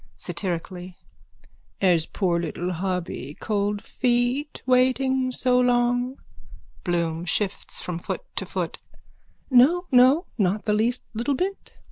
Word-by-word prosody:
(Satirically.) 180 Hz, -1 st, -4 dB, 0.8 s
Has 175 Hz, -4 st, +3 dB
poor 175 Hz, -4 st, 0 dB
little 170 Hz, +2 st, -3 dB
hubby 175 Hz, -6 st, -3 dB
cold 205 Hz, -1 st, -1 dB
feet 245 Hz, +5 st, 0 dB
waiting 255 Hz, 0 st, +2 dB
so 250 Hz, 0 st, +2 dB
long? 245 Hz, +1 st, +2 dB, 0.7 s
BLOOM: 170 Hz, -2 st, -1 dB
(Shifts 200 Hz, +2 st, -2 dB
from 175 Hz, -2 st, -4 dB
foot 175 Hz, -, -4 dB
to -, -, -2 dB
foot.) -, -, -3 dB, 0.7 s
No, 300 Hz, +9 st, +5 dB
no. 260 Hz, +7 st, +6 dB
Not 200 Hz, +2 st, +1 dB
the 210 Hz, -, +2 dB
least 230 Hz, +4 st, +1 dB
little 240 Hz, +6 st, 0 dB
bit. 385 Hz, +7 st, -4 dB
225 Hz, 115 wpm, -24 LUFS, 180-255 Hz, 0.8 s, no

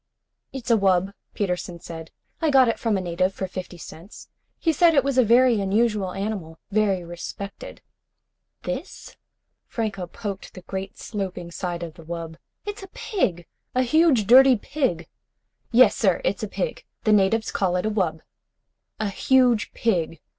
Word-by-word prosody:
"It's 255 Hz, -3 st, -4 dB
a 230 Hz, -, +6 dB
wub," 190 Hz, -1 st, +2 dB, 0.2 s
Peterson 180 Hz, -3 st, -2 dB
said. 165 Hz, -1 st, -9 dB, 0.3 s
"I 320 Hz, -, +2 dB
got 265 Hz, -3 st, +6 dB
it 230 Hz, -, 0 dB
from 225 Hz, -4 st, +1 dB
a -, -, -2 dB
native 185 Hz, +2 st, -1 dB
for 190 Hz, -, -3 dB
fifty 185 Hz, -1 st, -7 dB
cents. 170 Hz, +4 st, -12 dB, 0.3 s
He 325 Hz, -, +1 dB
said 335 Hz, +1 st, +5 dB
it 275 Hz, -, +5 dB
was 275 Hz, -2 st, +1 dB
a -, -, +7 dB
very 240 Hz, -1 st, +4 dB
unusual 205 Hz, -1 st, +1 dB
animal. 195 Hz, -5 st, -4 dB
Very 200 Hz, -3 st, +1 dB
respected." 175 Hz, +3 st, -8 dB, 0.8 s
"This?" -, -, -6 dB, 0.5 s
Franco 205 Hz, -6 st, -3 dB
poked 200 Hz, +2 st, -7 dB
the 185 Hz, -, -10 dB
great 190 Hz, +1 st, -6 dB
sloping 185 Hz, -5 st, -5 dB
side 175 Hz, -1 st, -4 dB
of 165 Hz, -2 st, -7 dB
the 165 Hz, -, -14 dB
wub. 165 Hz, 0 st, -6 dB, 0.3 s
"It's 415 Hz, 0 st, -5 dB
a 385 Hz, -, -9 dB
pig! 195 Hz, -, -2 dB, 0.3 s
A 255 Hz, -, +3 dB
huge 285 Hz, -4 st, +4 dB
dirty 260 Hz, +4 st, +8 dB
pig!" 205 Hz, -, -2 dB, 0.6 s
"Yes 250 Hz, +2 st, +6 dB
sir, -, -, +2 dB
it's -, -, 0 dB
a -, -, -2 dB
pig. -, -, -4 dB, 0.2 s
The 215 Hz, -, +4 dB
natives 210 Hz, +2 st, +2 dB
call 185 Hz, -2 st, 0 dB
it 180 Hz, -, 0 dB
a 215 Hz, -, 0 dB
wub." 170 Hz, -7 st, -1 dB, 0.8 s
"A 215 Hz, -1 st, 0 dB
huge 245 Hz, +1 st, +3 dB
pig. 170 Hz, -8 st, 0 dB
200 Hz, 160 wpm, -24 LUFS, 180-240 Hz, 0.8 s, dirty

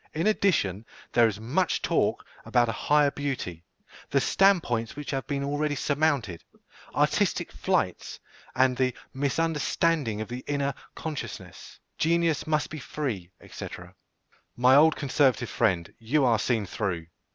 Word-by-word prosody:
In 160 Hz, -, 0 dB
addition, 160 Hz, -, +1 dB, 0.3 s
there 120 Hz, -1 st, +6 dB
is 105 Hz, -2 st, -4 dB
much 135 Hz, +12 st, 0 dB
talk -, -, +1 dB, 0.2 s
about 120 Hz, -1 st, +2 dB
a -, -, 0 dB
"higher 145 Hz, +5 st, +2 dB
beauty," 130 Hz, -, -4 dB, 0.5 s
"the -, -, +3 dB
stand 195 Hz, -3 st, +4 dB
points 115 Hz, -2 st, -2 dB
which 145 Hz, 0 st, -6 dB
have 135 Hz, -2 st, -3 dB
been 140 Hz, -1 st, -2 dB
already 145 Hz, +1 st, -1 dB
surmounted," 140 Hz, -, 0 dB, 0.5 s
"artistic -, -, +1 dB
flights," -, -, -1 dB, 0.4 s
and 130 Hz, 0 st, +3 dB
the 130 Hz, -1 st, 0 dB, 0.2 s
"misunderstanding 145 Hz, -3 st, 0 dB
of 110 Hz, -, -4 dB
the 125 Hz, +1 st, -6 dB
inner 140 Hz, -1 st, 0 dB, 0.2 s
consciousness," 155 Hz, -3 st, -7 dB, 0.2 s
"Genius 165 Hz, -1 st, +1 dB
must 155 Hz, -1 st, 0 dB
be 155 Hz, -, -5 dB
free," 125 Hz, -, -4 dB, 0.2 s
&c. -, -, -7 dB, 0.9 s
My 125 Hz, +2 st, +5 dB
old 155 Hz, +2 st, +6 dB
conservative 130 Hz, -4 st, +1 dB
friend, 90 Hz, -5 st, 0 dB
you 130 Hz, +5 st, +1 dB
are 115 Hz, -3 st, +3 dB
seen 110 Hz, -3 st, 0 dB
through. 90 Hz, -4 st, -3 dB
135 Hz, 140 wpm, -27 LUFS, 115-150 Hz, 0.9 s, there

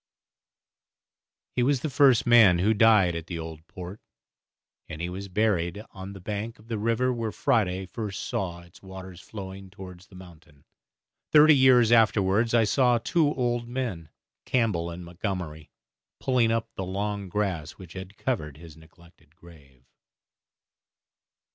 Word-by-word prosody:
He 125 Hz, -, +1 dB
was 130 Hz, +1 st, +2 dB
the 155 Hz, -, -2 dB
first 130 Hz, -3 st, +4 dB
man 115 Hz, -7 st, +6 dB
who 100 Hz, +6 st, +2 dB
died 105 Hz, -6 st, +4 dB
at 85 Hz, 0 st, -6 dB
the 85 Hz, -, -5 dB
Old 80 Hz, 0 st, -8 dB
Port, 90 Hz, +3 st, -9 dB, 0.9 s
and 75 Hz, -, -7 dB
he 85 Hz, +1 st, -3 dB
was 95 Hz, +2 st, -6 dB
buried 100 Hz, -1 st, -1 dB
on 95 Hz, +1 st, -9 dB
the 100 Hz, -, -10 dB
bank 105 Hz, +4 st, -5 dB
of 110 Hz, +2 st, -20 dB
the 110 Hz, -2 st, -2 dB
river 115 Hz, +4 st, +1 dB
where 115 Hz, -2 st, -3 dB
Friday 95 Hz, -5 st, 0 dB
first 100 Hz, +1 st, -5 dB
saw 85 Hz, -3 st, -3 dB
its 85 Hz, 0 st, -18 dB
waters 95 Hz, -2 st, -10 dB
flowing 95 Hz, -2 st, -9 dB
towards 90 Hz, -1 st, -12 dB
the 95 Hz, -, -17 dB
mountain. 85 Hz, -5 st, -16 dB, 0.7 s
Thirty 155 Hz, 0 st, +7 dB
years 125 Hz, -4 st, +5 dB
afterwards 110 Hz, 0 st, +3 dB
I 115 Hz, -, +5 dB
saw 125 Hz, +2 st, +3 dB
two 150 Hz, +5 st, +1 dB
old 120 Hz, -2 st, -1 dB
men, 120 Hz, -11 st, -4 dB, 0.3 s
Campbell 105 Hz, -9 st, 0 dB
and 85 Hz, +1 st, -8 dB
Montgomery, 85 Hz, -4 st, -5 dB, 0.5 s
pulling 125 Hz, -3 st, +2 dB
up 115 Hz, -1 st, -2 dB
the 95 Hz, -, -5 dB
long 100 Hz, +1 st, -3 dB
grass 90 Hz, -6 st, -2 dB
which 90 Hz, -3 st, -13 dB
had 95 Hz, +1 st, -9 dB
covered 75 Hz, -, -3 dB
his 80 Hz, -1 st, -13 dB
neglected 80 Hz, -1 st, -21 dB
grave. 75 Hz, -8 st, -18 dB
95 Hz, 150 wpm, -26 LUFS, 85-115 Hz, 0.9 s, Thirty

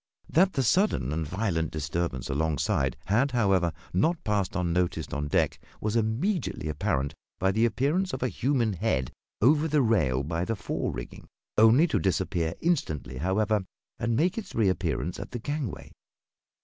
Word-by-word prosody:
That 185 Hz, +3 st, +3 dB
the 135 Hz, -, +1 dB
sudden 115 Hz, -, +2 dB
and 80 Hz, -1 st, -2 dB
violent 85 Hz, -3 st, -1 dB
disturbance 75 Hz, -2 st, -3 dB
alongside 70 Hz, -3 st, 0 dB
had, 125 Hz, +7 st, +2 dB
however, 95 Hz, -7 st, +3 dB, 0.2 s
not 160 Hz, -, +1 dB
passed 105 Hz, -4 st, 0 dB
unnoticed 90 Hz, -2 st, -1 dB
on 75 Hz, 0 st, -2 dB
deck -, -, +1 dB, 0.2 s
was 105 Hz, +1 st, -2 dB
immediately 115 Hz, -, 0 dB
apparent 70 Hz, -1 st, -1 dB, 0.2 s
by 95 Hz, +1 st, +2 dB
the 110 Hz, +4 st, +3 dB
appearance 145 Hz, -, +1 dB
of -, -, -3 dB
a -, -, +2 dB
human 120 Hz, -3 st, 0 dB
head 90 Hz, -, -1 dB, 0.3 s
over 150 Hz, +5 st, +5 dB
the 150 Hz, -2 st, +3 dB
rail 75 Hz, -, +2 dB
by 80 Hz, +4 st, -2 dB
the 115 Hz, +5 st, -1 dB
fore -, -, -3 dB
rigging, -, -, -8 dB, 0.3 s
only 115 Hz, +8 st, +6 dB
to 160 Hz, -, 0 dB
disappear 85 Hz, -2 st, 0 dB
instantly, 80 Hz, -, -1 dB
however, 100 Hz, +5 st, +1 dB, 0.4 s
and 115 Hz, -1 st, 0 dB
make 175 Hz, -, +1 dB
its 205 Hz, -, -9 dB
reappearance 95 Hz, -, 0 dB
at -, -, -6 dB
the -, -, -5 dB
gangway. 145 Hz, -1 st, -4 dB
100 Hz, 155 wpm, -27 LUFS, 80-125 Hz, 0.4 s, only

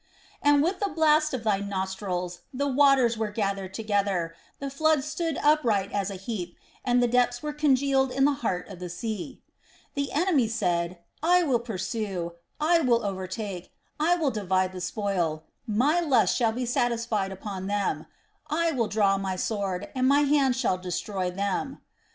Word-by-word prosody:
"And 290 Hz, 0 st, +5 dB
with 365 Hz, +3 st, 0 dB
the 405 Hz, -, 0 dB
blast 310 Hz, -2 st, +3 dB
of 255 Hz, -4 st, -3 dB
thy 210 Hz, -3 st, +2 dB
nostrils 190 Hz, -2 st, -3 dB
the 280 Hz, +2 st, -1 dB
waters 265 Hz, -4 st, +4 dB
were 220 Hz, -1 st, 0 dB
gathered 195 Hz, -3 st, -2 dB
together, 200 Hz, -6 st, 0 dB, 0.2 s
the 275 Hz, -1 st, -5 dB
floods 310 Hz, 0 st, +2 dB
stood 315 Hz, 0 st, -2 dB
upright 235 Hz, -10 st, +3 dB
as 200 Hz, -1 st, -1 dB
an 195 Hz, -, -5 dB
heap, 185 Hz, -3 st, -5 dB, 0.3 s
and 245 Hz, 0 st, +3 dB
the -, -, +4 dB
depths 245 Hz, +1 st, +1 dB
were 300 Hz, 0 st, -3 dB
congealed 275 Hz, -2 st, +2 dB
in 270 Hz, +1 st, +2 dB
the 290 Hz, -, +4 dB
heart 185 Hz, -6 st, -1 dB
of 195 Hz, -3 st, -10 dB
the 180 Hz, -1 st, -6 dB
sea. 215 Hz, +7 st, -5 dB, 0.5 s
"The 280 Hz, -1 st, -2 dB
enemy 300 Hz, -6 st, +2 dB
said, 175 Hz, -5 st, -1 dB, 0.2 s
I 355 Hz, +3 st, +4 dB
will 260 Hz, -7 st, +2 dB
pursue, 200 Hz, -5 st, -3 dB, 0.3 s
I 335 Hz, +3 st, +4 dB
will 240 Hz, -7 st, +2 dB
overtake, 190 Hz, -1 st, -5 dB, 0.3 s
I 335 Hz, +4 st, +3 dB
will 310 Hz, -6 st, 0 dB
divide 190 Hz, -3 st, 0 dB
the 185 Hz, -1 st, -7 dB
spoil; 180 Hz, -5 st, -1 dB, 0.2 s
my 260 Hz, +10 st, +2 dB
lust 275 Hz, -9 st, +3 dB
shall 235 Hz, -3 st, +2 dB
be 245 Hz, +2 st, -3 dB
satisfied 235 Hz, -4 st, 0 dB
upon 190 Hz, -1 st, -6 dB
them; 205 Hz, 0 st, -1 dB, 0.4 s
I 330 Hz, +2 st, +1 dB
will 240 Hz, -7 st, 0 dB
draw 200 Hz, -2 st, +2 dB
my 190 Hz, -1 st, -2 dB
sword, 195 Hz, -1 st, -2 dB
my 265 Hz, +3 st, +4 dB
hand 280 Hz, -3 st, +3 dB
shall 235 Hz, -8 st, 0 dB
destroy 185 Hz, +1 st, -3 dB
them. 200 Hz, +8 st, -2 dB
225 Hz, 165 wpm, -27 LUFS, 190-275 Hz, 0.5 s, And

